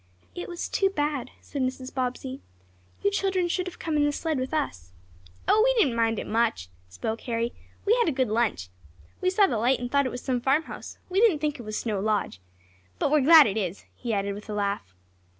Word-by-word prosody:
"It 355 - -6
was 345 -1 -4
too 390 - +2
bad," 295 -7 -2
said 280 - -5
Mrs. 255 0 -3
Bobbsey. 260 +1 -3 0.6
"You 405 - +3
children 385 -3 +1
should 365 +1 -1
have 360 - -7
come 315 -2 -2
in 295 - +3
the 290 - +3
sled 310 -1 -2
with 260 +1 -3
us." 90 - -3 0.5
"Oh, 435 - +5
we - - +3
didn't 285 - +3
mind 225 -1 +2
it - - -3
much," 220 - 0 0.2
spoke 155 - -4
Harry. 230 +1 -1 0.3
"We 430 +3 +5
had 475 -8 +3
a - - +1
good 260 -4 0
lunch. 215 - 0 0.5
We 370 - +3
saw 395 +2 +4
the 235 - 0
light 245 +3 +3
and 245 0 -5
thought 280 -1 +3
it - - -4
was 245 - -6
some 250 -2 0
farmhouse. 275 +5 -1
We 375 +1 0
didn't 440 -9 +5
think 295 -2 -2
it - - -5
was 215 -2 -4
Snow 215 -4 -2
Lodge. 210 - -1 0.6
But - - 0
we're 305 -1 +5
glad 310 +2 +9
it 210 -2 -1
is," 190 -3 -3
he 240 - -5
added 200 -1 0
with 210 +2 -10
a 210 - -3
laugh. 200 - -2
255 Hz, 220 wpm, -26 LUFS, 220-315 Hz, 0.6 s, glad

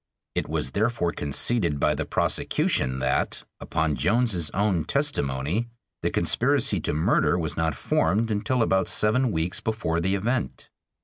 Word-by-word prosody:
It - - -2
was 65 - -2
therefore 110 -5 0
conceded 80 - 0
by - - +2
the - - -3
prosecution 65 0 0
that, 65 0 0 0.2
upon 80 -2 -1
Jones's 95 - +1
own 95 -4 0
testimony, 100 - -1 0.3
the - - 0
conspiracy - - +2
to - - -2
murder 80 +3 +2
was 80 -3 -2
not 80 -3 0
formed 100 - +1
until 115 +4 +1
about 95 -3 +1
seven 120 +4 +2
weeks 85 +1 -1
before 110 -7 -1
the 95 +3 0
event. 105 - -2
90 Hz, 140 wpm, -25 LUFS, 80-110 Hz, 0.3 s, by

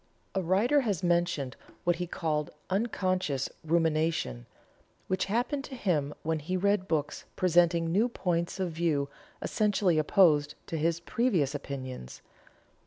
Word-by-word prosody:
A 190 - 0
writer 210 - +3
has 205 -9 -1
mentioned 170 -6 +1 0.3
what 175 -1 +2
he 175 0 -3
called 150 -3 -1 0.2
"unconscious 185 - 0
rumination," 160 - 0 0.6
which 185 0 0
happened 245 +7 -1
to 270 - -8
him 160 - 0
when 160 0 0
he 180 +5 -2
read 200 0 +1
books 150 -4 -2
presenting 170 -2 +3
new 215 +7 +3
points 175 -4 -1
of 185 -2 -1
view 155 -4 0 0.3
essentially 200 -6 +2
opposed 155 -2 +4
to 165 - -4
his 165 +2 +1
previous 175 - +1
opinions. 130 - -6
170 Hz, 130 wpm, -29 LUFS, 155-190 Hz, 0.6 s, opposed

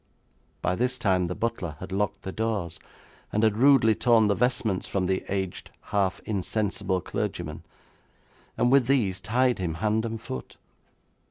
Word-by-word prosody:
By 90 - +2
this 125 +6 0
time 95 -6 +2
the 90 +1 -3
butler 110 -9 -3
had 95 +1 -8
locked 100 0 -1
the 95 - -4
doors, 100 -6 -2 0.5
and 105 - +1
had 110 -2 +3
rudely 130 -3 +6
torn 115 -1 +4
the - - +4
vestments 110 -4 0
from 95 -2 -1
the 95 +1 0
aged, 95 -2 -3 0.2
half 100 -1 +1
insensible 100 -2 -1
clergyman, - - -4 1.0
and 120 +2 +3
with 135 -3 +5
these 110 -9 +2
tied 125 +4 +1
him 85 -3 -2
hand 110 +4 0
and 115 -1 -4
foot. 65 - -7
105 Hz, 155 wpm, -26 LUFS, 95-115 Hz, 1.0 s, rudely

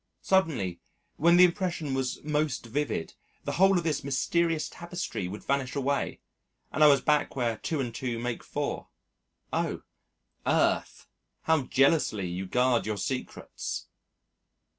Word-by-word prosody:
Suddenly 145 - +1 0.4
when 170 +3 +5
the 180 - +9
impression 175 -5 +1
was 130 -1 -2
most 150 -4 -1
vivid, 130 - -2 0.3
the - - -2
whole 195 +1 +4
of 175 - 0
this 155 -4 -1
mysterious 160 +4 +1
tapestry 175 - -5
would 100 +4 -7
vanish 135 -1 -1
away 140 0 -1 0.5
and 155 - +2
I - - +9
was 140 -3 +5
back 150 -1 +1
where 120 -4 0
2 155 +6 -3
and 120 -4 -2
2 120 0 -3
make 120 0 -3
4. - - -3 0.7
Oh! - - -1 0.6
Earth! - - +1 0.4
how 160 -4 +2
jealously 135 - +2
you 90 +2 -4
guard 125 +1 +2
your 105 -1 -1
secrets! 130 +6 -4
140 Hz, 140 wpm, -28 LUFS, 120-160 Hz, 0.7 s, the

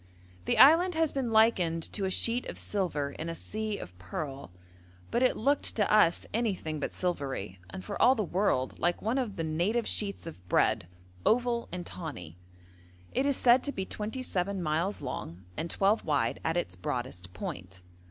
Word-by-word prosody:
The - - +1
island 330 +6 +7
has 320 -1 +2
been 260 -4 -2
likened 185 -7 +3
to 200 - -1
a - - 0
sheet 235 +5 0
of - - -6
silver 165 -8 -1
in 160 +3 -5
a 165 - -4
sea 215 +3 -3
of 90 - -9
pearl, 135 - -5 0.6
but 235 - +1
it 255 - +3
looked 280 +5 +1
to 210 -2 +2
us 190 -6 +4
anything 190 -9 -1
but - - -3
silvery, 135 - -3
and 95 0 -8
for - - -4
all 260 - +7
the 215 - 0
world 180 -8 0
like 175 +1 +1
one 230 +5 +1
of 225 -6 -2
the 165 - -2
native 175 +9 0
sheets 200 -4 -1
of 160 - -9
bread 110 -2 +2 0.4
oval 240 0 +2
and 175 0 -5
tawny. 90 - -7 0.7
It 265 +2 +1
is 280 - +1
said 245 +1 +5
to 285 - -1
be 190 -8 -3
twenty 220 +7 -4
seven 195 -3 -1
miles 165 +6 -1
long 85 +3 -6
and 165 - -3
twelve 200 +5 +2
wide 140 -7 0
at 165 +1 0
its 90 - -2
broadest 95 -1 -4
point. 90 +1 -7
180 Hz, 180 wpm, -30 LUFS, 140-225 Hz, 0.7 s, island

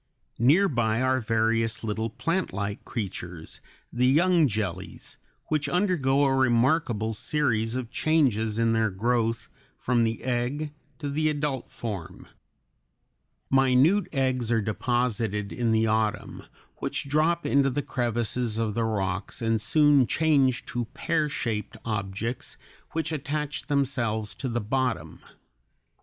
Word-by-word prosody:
Near 155 - +5
by 120 - 0
are 130 0 +2
various 115 0 0
little 110 +1 -2
plantlike 115 - -2
creatures, 90 -7 -6 0.3
the 125 +1 +2
young 165 +3 +4
jellies, 100 -5 -5 0.3
which 150 -2 0
undergo 150 -7 +2
a 135 - +2
remarkable 120 -3 +2
series 115 -3 0
of 125 -2 -4
changes 125 -9 +2
in 115 0 +2
their 110 -1 +2
growth 115 +3 0 0.3
from 120 -2 +1
the 115 0 -2
egg 130 +5 -2 0.2
to 145 - -5
the 155 +2 +1
adult 145 -4 -2
form. 100 -8 -6 1.2
Minute 135 +9 +4
eggs 130 -4 0
are 115 - +3
deposited 110 -2 -1
in 120 -2 0
the 110 0 +3
autumn, 110 -1 -1 0.3
which - - -3
drop 160 +4 +1
into 140 -1 +3
the 140 +2 -2
crevices 120 -1 -1
of 110 -2 -1
the 115 +1 0
rocks 95 -3 -2
and 115 -1 0
soon 145 +2 +4
change 140 -5 +2
to 120 -1 -3
pear 160 -2 0
shaped 110 -6 -3
objects 110 +2 -3 0.4
which 160 0 -1
attach 150 0 -3
themselves 120 -7 0
to 130 - -4
the 120 0 -1
bottom. 125 +3 -2
120 Hz, 125 wpm, -26 LUFS, 110-140 Hz, 1.2 s, Near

